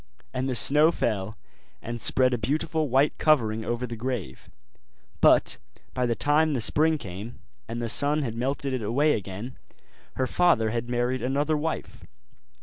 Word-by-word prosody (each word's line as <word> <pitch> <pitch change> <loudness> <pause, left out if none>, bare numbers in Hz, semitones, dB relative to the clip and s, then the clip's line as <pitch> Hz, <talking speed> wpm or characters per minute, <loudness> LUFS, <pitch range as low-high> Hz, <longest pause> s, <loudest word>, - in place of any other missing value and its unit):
And 130 +1 -2
the 130 - -1
snow 150 +10 +5
fell 105 - -2 0.4
and 120 0 -6
spread 130 +2 +3
a - - +1
beautiful 150 +5 -1
white 135 +4 +2
covering 110 -8 +2
over 120 +2 -3
the 120 -1 -6
grave; 115 - -5 0.7
but - - +4 0.3
by 125 -1 0
the 115 - 0
time 150 +2 +2
the - - 0
spring 155 +7 +2
came, 105 0 -8 0.3
and 120 0 -5
the - - -2
sun 145 +6 +1
had 115 -4 -3
melted 135 +3 -2
it 130 - -2
away 140 +8 +2
again, 100 +6 -6 0.6
her 130 - 0
father 130 -9 +2
had 120 +1 -3
married 125 +1 -1
another 140 +5 0
wife. 155 +2 -4
125 Hz, 160 wpm, -26 LUFS, 115-145 Hz, 0.7 s, snow